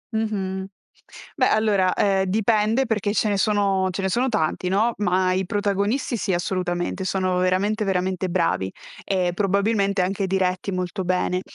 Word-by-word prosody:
Mh-mh. 190 -3 -2 0.7
Beh, - - +2
allora, 205 -4 +2
ehm, 195 -1 +2
dipende 215 +5 +2
perché 210 -3 -1
ce 215 - +1
ne 200 - 0
sono 195 -2 +2
ce 185 +2 -4
ne 190 - 0
sono 250 +6 +1
tanti, 180 -3 -1
no? 215 +5 +2
Ma 185 -2 +1
i 185 0 -1
protagonisti 205 +5 -1
sì, 195 - -1
assolutamente 175 +1 -2
sono 185 -1 0
veramente, 195 +4 +1
veramente 185 -1 -1
bravi 165 - 0 0.3
e 185 -2 0
probabilmente 200 +1 +1
anche 195 +1 -1
diretti 185 0 -1
molto 185 +1 -3
bene. 180 0 0
190 Hz, 150 wpm, -23 LUFS, 185-210 Hz, 0.7 s, Beh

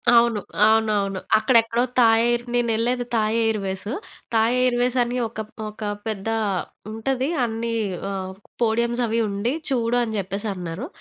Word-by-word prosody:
అవును. 235 -2 +4 0.3
అవునవును. 215 -3 +2 0.2
అక్కడెక్కడో 230 +1 +3 0.2
Thai 225 -1 +6
air 240 0 +1
నేనెళ్ళేది 240 +1 +1
Thai 215 0 +1
airways. 195 -2 -2 0.4
Thai 225 +2 +3
Airways 250 0 +2
అని 245 +1 -3
ఒక 220 0 -6
ప్ - - -27 0.2
ఒక 210 +1 -14 0.3
పెద్దా 220 +1 -2 0.6
ఉంటది. 255 +4 -1 0.2
అన్నీ 230 +1 -3 0.4
ఆహ్, 190 -1 -4 0.3
పోడియమ్సవి 235 0 +1
ఉండి, 205 +6 -1 0.2
చూడు 240 -2 +1
అని 220 -2 -3
జెప్పేసన్నారు. 195 - -4
225 Hz, 125 wpm, -23 LUFS, 215-240 Hz, 0.6 s, Thai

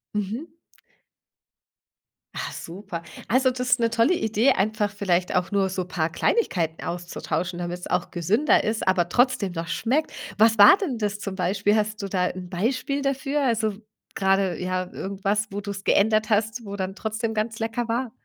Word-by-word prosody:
Mhm. 220 - -4 1.8
Ah, - - -4
super. 175 0 -7 0.3
Also, 260 +3 +3
das 255 0 -5
ist 240 - +5
'ne 230 -1 +2
tolle 230 +8 +3
Idee, 220 - +2
einfach 210 0 0
vielleicht 185 -3 0
auch 180 +1 0
nur 195 -1 +2
so 185 -1 -3
paar 165 -3 -1
Kleinigkeiten 170 - 0
auszutauschen, 175 0 -3
damit's 175 0 -4
auch 180 - -1
gesünder 200 - +2
ist, 220 +1 -1
aber 185 -2 +3
trotzdem 240 -5 +2
noch 165 -1 -4
schmeckt. 240 - 0 0.3
Was 225 +1 +5
war 205 - +10
denn 330 - -3
das 205 -2 -2
zum 195 -2 -5
Beispiel? 195 +3 +1
Hast 215 0 -1
du 200 - -3
da 185 -1 +1
'n 180 0 -5
Beispiel 255 +9 -1
dafür? 275 +1 -1
Also, 225 -4 +1 0.4
grade, 195 -2 +1
ja, 185 0 -2
irgendwas, 200 +2 -2
wo 205 - -4
du's 200 -1 -6
geändert 215 +1 +3
hast, 220 +2 0
wo 200 0 -6
dann 190 -1 -4
trotzdem 220 +1 -3
ganz 220 +1 -2
lecker 230 +1 -2
war? 235 +1 -1
205 Hz, 170 wpm, -24 LUFS, 185-230 Hz, 1.8 s, war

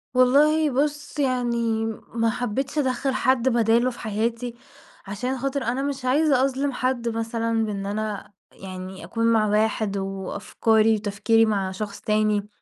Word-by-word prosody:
والله 295 +5 +4
بُص 285 +2 -2
يعني 235 -4 0 0.3
ما 230 -1 +1
حبيتش 250 +5 -3
أدخّل 265 -1 0
حد 260 -1 +2
بداله 235 +1 +3
في 240 - -12
حياتي 230 +2 -2 0.5
عشان 250 +7 -3
خاطر 275 +1 -2
أنا 250 +3 -1
مش 275 -2 -3
عايزة 275 0 +3
أظلم 275 +1 -1
حد 255 -2 -1
مثلًا 225 0 -1
بإن 200 -2 -4
أنا 210 0 -4 0.2
يعني 185 -1 -8
أكون 230 +7 -2
مع 215 -1 +3
واحد 210 -1 +1
وأفكاري 200 +3 +1
وتفكيري 215 +2 +2
مع 200 -3 -1
شخص 200 +1 -6
تاني، 210 -1 +1
230 Hz, 140 wpm, -24 LUFS, 215-260 Hz, 0.5 s, والله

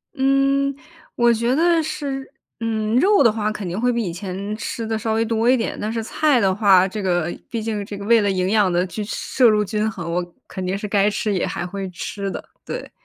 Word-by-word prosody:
嗯， 275 +1 +2 0.4
我 240 -1 +4
觉 235 +3 +1
得 335 +1 +3
是， 285 -4 -4 0.3
嗯， 220 -1 -1
肉 395 +5 +5
的 230 - +5
话 215 -1 -1
肯 210 -3 -5
定 175 +4 -3
会 245 +2 +2
比 235 -1 -1
以 175 -5 -3
前 195 +3 -5
吃 225 +1 -4
得 220 0 -1
稍 220 0 -1
微 225 +1 +1
多 230 +1 +1
一 260 - +5
点， 225 - -2
但 210 +1 -2
是 225 0 -2
菜 290 +3 +2
的 195 -3 +2
话， 190 -2 +5
这 210 +2 -5
个 175 -3 0
毕 230 -2 -3
竟 215 -2 -2
这 200 0 -7
个 200 - -7
为 230 +1 +5
了 205 - +1
营 185 -1 0
养 210 -4 +3
的 175 +1 +1
均 210 +3 -5
摄 240 +3 +2
入 210 -1 +2
均 215 +1 -1
衡， 170 -5 -5
我 180 +1 0 0.2
肯 190 - -6
定 185 +2 -1
是 210 - -5
该 200 0 +3
吃 210 0 -1
也 185 - 0
还 175 - -4
会 195 +1 -5
吃 195 +2 -5
的， - - -6 0.2
对。 - - -6
215 Hz, 255 characters per minute, -21 LUFS, 195-235 Hz, 0.4 s, 肉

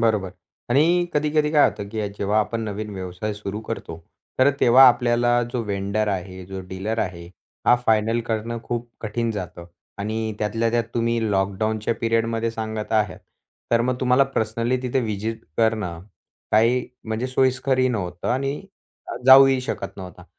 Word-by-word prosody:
बरोबर, 105 -5 +1 0.4
आणि 170 +7 +3
कधी-कधी 150 0 +1
काय 150 -2 +6
होतं, 100 -1 -7
की 105 -1 -3
जेव्हा 105 +2 +1
आपण 115 +2 -2
नवीन 105 0 -5
व्यवसाय 95 +3 -4
सुरू 105 +1 -5
करतो. 110 -7 -6 0.4
तर 130 +2 +6
तेव्हा 130 +2 +8
आपल्याला 120 0 +2
जो 120 -2 -1
वेन्डर 100 +1 -1
आहे 95 -1 -4
जो 95 0 -6
डीलर 105 +5 -3
आहे 85 -4 -3 0.4
हा 120 - +7
फायनल 110 +1 +2
करणं 115 +1 -2
खूप 120 0 -4
कठीण 115 +1 -2
जातं. 90 -4 -6 0.3
आणि 110 +1 -3
त्यातल्या 115 +2 0
त्यात 120 0 +1
तुम्ही 115 -2 0
लॉकडाऊनच्या 105 +3 0
पिरियडमध्ये 115 0 0
सांगत 110 -1 -5
आहात. 105 -2 +1 0.5
तर 115 0 +4
मग 125 +2 +1
तुम्हाला 130 +2 +4
पर्सनली 115 -1 -1
तिथे 130 +1 0
व्हिजिट 110 0 -3 0.2
करणं 110 -7 0 0.5
का 105 - +6
ही 125 +2 +2 0.2
म्हणजे 110 +3 -2
सोयीस्करही 130 0 +2
नव्हतं, 90 -7 -3
आणि 135 +3 -1 0.7
जाऊही 135 0 +8
शकत 100 -5 -5
नव्हता. 90 -2 -10
115 Hz, 150 wpm, -23 LUFS, 105-120 Hz, 0.7 s, तेव्हा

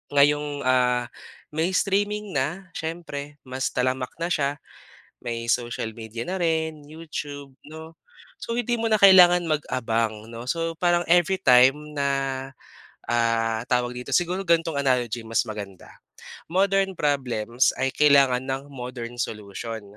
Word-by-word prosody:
Ngayong, 145 0 +2
ah, 125 -1 +2 0.4
may 160 +2 0
streaming 205 +1 0
na 165 +8 -2
siyempre 160 -3 -6
mas 130 +1 -2
talamak 130 0 -1
na - - 0
siya, 140 -2 0 0.7
may 115 -1 -4
social 120 -2 -1
media 115 +1 -7
na 190 +1 -3
rin 160 -2 -1
YouTube 145 -3 -7 0.2
'no. 160 +1 -10 0.5
So 230 - -3
hindi 240 0 -1
mo 225 0 -1
na 215 - +4
kailangan 180 -3 +7
mag-abang 115 -7 -1
'no. 115 +2 -8
So, 165 +1 -1
parang 175 0 +2
every 175 +2 +4
time 135 +3 +4
na, 140 -1 0 1.0
ah, 115 -1 +1
tawag 125 -1 0
dito - - -9
siguro 180 +2 0
gantong 165 -3 +2
analogy 125 -4 0
mas 115 +1 +1
maganda, 100 -3 -8 0.6
modern 195 +2 +1
problems 125 -4 +1
ay 135 - +2
kailangan 140 -4 +4
ng 135 +1 -4
modern 125 -2 -7
solution. 110 -1 -5
140 Hz, 130 wpm, -24 LUFS, 120-165 Hz, 1.0 s, kailangan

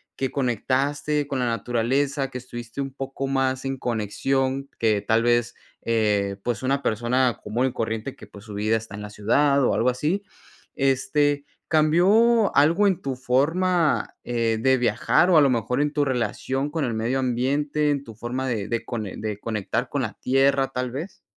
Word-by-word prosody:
que 135 - -1
conectaste 140 +3 0
con 135 -2 -2
la 125 - 0
naturaleza, 125 +5 0
que 130 - -6
estuviste 120 0 -7
un 135 -1 -5
poco 135 0 -5
más 135 -1 0
en 135 0 -2
conexión, 130 +4 -1
que 110 -3 +2
tal 110 +3 +2
vez, 120 0 +1 0.3
eh, 105 -3 +1
pues, 120 -4 -2
una 140 +2 0
persona 120 +3 +1
común 120 +4 0
y 130 - -4
corriente 115 +2 -3
que, - - -13
pues, 100 0 -14
su 105 - -9
vida 105 +2 +1
está 110 -2 -9
en 105 - -7
la 105 - -7
ciudad, 140 +7 +2
o - - +2
algo 120 - +2
así. 155 +10 -1 0.5
Este, 140 +2 +1 0.2
¿cambió 195 +9 +4
algo 165 +8 +4
en 185 -2 0
tu 135 -1 -3
forma, 155 +7 +1
eh, 115 -2 0
de 130 +1 +4
viajar, 125 +8 +2
o 165 - +6
a - - +8
lo 140 - +4
mejor 125 +2 0
en 150 0 +1
tu 145 -1 +1
relación 130 +2 -1
con 155 -1 -1
el 120 - -2
medio 115 +4 -1
ambiente, 140 +4 0
en 140 -1 0
tu 115 - -11
forma 125 +4 -3
de 110 -5 -2
de 115 +1 -2
cone 110 -5 -4
de 105 -2 -4
conectar 105 -3 -2
con - - -1
la - - -3
tierra, 135 +1 +3
tal 125 -1 -3
vez? 155 +10 -7
130 Hz, 185 wpm, -24 LUFS, 115-140 Hz, 0.5 s, a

